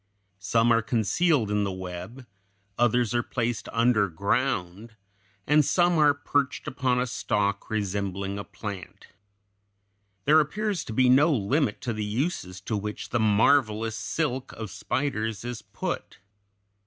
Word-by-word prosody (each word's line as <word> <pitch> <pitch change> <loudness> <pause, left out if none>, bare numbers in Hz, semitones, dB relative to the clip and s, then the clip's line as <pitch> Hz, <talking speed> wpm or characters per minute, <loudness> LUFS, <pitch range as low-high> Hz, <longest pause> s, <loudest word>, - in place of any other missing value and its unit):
Some 115 +4 +2
are 115 - +3
concealed 115 - +1
in 105 0 +1
the 100 - -1
web; 95 +7 -7 0.5
others 120 0 +2
are 120 - +2
placed 120 -3 -3
underground; 105 -1 0 0.5
and 150 +1 +4
some 175 +3 +3
are 145 -2 +5
perched 145 -1 -1
upon 130 -1 0
a 125 - +1
stalk 105 -4 -1
resembling 100 -1 -2
a - - -4
plant. 100 -2 -8 1.2
There 155 +2 +6
appears 195 +4 -1
to 110 - -6
be 130 +3 +4
no 140 +6 +5
limit 130 0 0
to 120 -2 -2
the 110 -1 -3
uses 105 - -2
to 110 - -3
which 105 +1 -5
the 120 - 0
marvelous 110 0 +3
silk 130 +2 -2
of 110 -4 -7
spiders 115 -6 -2
is 120 -2 -5
put. - - -5
115 Hz, 135 wpm, -26 LUFS, 105-135 Hz, 1.2 s, There